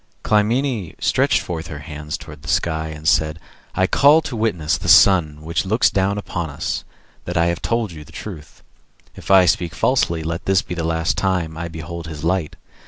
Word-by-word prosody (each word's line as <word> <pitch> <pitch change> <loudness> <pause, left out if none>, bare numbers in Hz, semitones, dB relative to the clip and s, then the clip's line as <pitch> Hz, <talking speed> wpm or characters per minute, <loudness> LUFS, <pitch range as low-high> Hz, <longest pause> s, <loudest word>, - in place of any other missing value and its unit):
Clymene 110 - 0
stretched - - +2
forth 85 -2 -5
her 75 - -7
hands 75 0 -5
towards 75 -2 -12
the 75 - -12
skies, 80 -1 -1
and 80 +1 -6
said, 80 -1 +2 0.4
"I 95 - +3
call 145 +10 +5
to 135 - -5
witness 90 -9 0
the - - -6
Sun 85 -4 +5
which 85 +1 -1
looks 110 +5 +2
down 100 +1 0
upon 85 -5 -4
us, 70 - -3 0.4
that 90 0 -3
I 85 - +3
have 85 - -8
told 115 -4 -1
you 75 -2 -10
the - - -17
truth. 85 -6 -10 0.5
If - - -11
I 95 -2 +7
speak 85 -1 0
falsely, 85 -8 +1
let 85 +2 -4
this 95 -1 +2
be - - -6
the 85 -2 -3
last 80 +1 0
time 90 -5 -1
I 85 +1 -4
behold 80 +1 -7
his 80 -2 -8
light. 85 -2 -1
85 Hz, 195 wpm, -20 LUFS, 80-95 Hz, 0.5 s, I